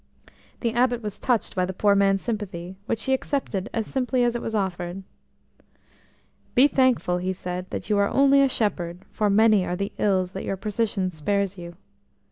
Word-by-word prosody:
The 230 -2 0
Abbot 245 -1 +1
was 210 -2 -5
touched 240 -5 0
by 185 - +1
the 185 0 -3
poor 205 +1 +3
man's 195 -1 +2
sympathy, 190 -6 -4
which 225 -1 -1
he 265 - +1
accepted 260 -7 -2
as 225 -1 -2
simply 250 -1 0
as 240 0 +1
it 240 - -2
was 225 - -3
offered. 190 -2 -3 1.5
E 265 +3 +8
thankful," 255 -10 +2
he 185 +1 -2
said, 180 0 -5
"that - - -5
you 210 -2 +2
are 200 - +3
only 275 0 +5
a 275 - +4
shepherd, 180 -7 -2
for 210 -1 0
many 215 -1 +5
are 180 - -2
the 200 +2 -3
ills 185 -3 +1
that 190 - -6
your 195 - -3
position 205 -2 -1
spares 200 +5 -1
you." 170 -2 -9
200 Hz, 185 wpm, -24 LUFS, 185-235 Hz, 1.5 s, E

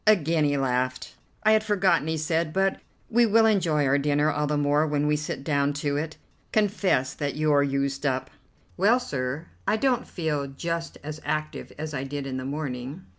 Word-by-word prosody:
Again 165 -6 +4
he 145 -1 +1
laughed. 130 -1 -1 0.3
"I 215 - +5
had 215 0 +4
forgotten," 195 -7 +2
he 160 0 -1
said, 160 +1 0
"but 195 0 +1 0.3
we 235 +1 +5
will 225 +1 +5
enjoy 170 -9 +2
our 140 +1 +3
dinner 145 +1 +2
all 150 0 -1
the 150 0 0
more 145 +2 +2
when 145 -1 0
we 150 0 +2
sit 150 -2 -4
down 145 -1 +1
to 145 0 -2
it. 155 +2 -3 0.3
Confess 195 -11 +1
that 145 -1 -3
you're 150 -1 +3
used 140 0 -1
up." 130 -2 -1 0.5
"Well, 215 +7 +4
sir, 140 - -3 0.2
I 220 - +3
don't 255 +1 +1
feel 150 -5 -2
just 165 +4 -4
as 155 +1 -6
active 155 0 -3
as 155 +1 -5
I 130 -1 -2
did 140 0 -4
in 130 -1 -4
the 130 - -5
morning." 140 +2 -5
150 Hz, 190 wpm, -26 LUFS, 140-170 Hz, 0.5 s, I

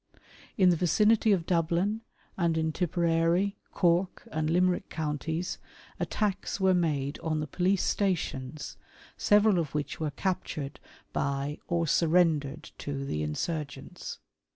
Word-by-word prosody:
" - - -23
In 185 -3 +6
the - - +3
vicinity 210 +6 +3
of 180 -5 +2
Dublin, 175 +6 +1 0.3
and 170 -3 +1
in 160 0 +1
Tipperary, 170 +3 +1
Cork, 175 +1 +1
and 155 0 -1
Limerick 180 +2 +2
counties, 160 +3 -3 0.4
attacks 205 -1 -1
were 190 -1 +4
made 150 -5 0
on 155 -2 -1
the 150 - -1
police 180 +6 +1
stations, 155 -7 -1 0.4
several 205 -2 +4
of 150 -4 -3
which 150 -1 -2
were 155 -1 -1
captured 155 -3 -3 0.3
by 140 +1 -1
or 170 -1 +1
surrendered 155 -3 +2
to 140 -1 -4
the 75 - -2
insurgents. 140 - -4
165 Hz, 130 wpm, -29 LUFS, 150-185 Hz, 0.4 s, In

